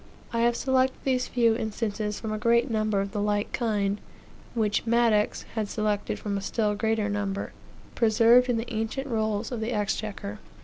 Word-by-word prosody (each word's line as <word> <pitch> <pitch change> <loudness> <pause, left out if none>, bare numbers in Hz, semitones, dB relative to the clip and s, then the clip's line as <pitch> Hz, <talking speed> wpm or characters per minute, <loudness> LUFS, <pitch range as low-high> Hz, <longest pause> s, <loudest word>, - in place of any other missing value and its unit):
I 230 - 0
have 235 0 +3
selected 260 0 +1
these 255 -2 +1
few 230 -2 +3
instances 215 -2 -2
from 220 -1 -4
a 215 - -3
great 235 +3 +3
number 215 -2 +1
of 195 0 -4
the 205 0 -2
like 205 0 0
kind, 205 -4 0 0.5
which 215 0 0
Madox 230 -3 +2
had 215 -2 -2
selected 210 -2 -1
from 200 -1 -3
a - - -8
still 210 +1 0
greater 220 0 0
number, 200 -1 -3 0.4
preserved 235 +2 +5
in 240 - +2
the 230 +1 -4
ancient 225 +5 -2
rolls 220 -3 -1
of 245 - -3
the 220 +2 -2
exchequer. 210 -1 -3
220 Hz, 175 wpm, -27 LUFS, 210-235 Hz, 0.5 s, preserved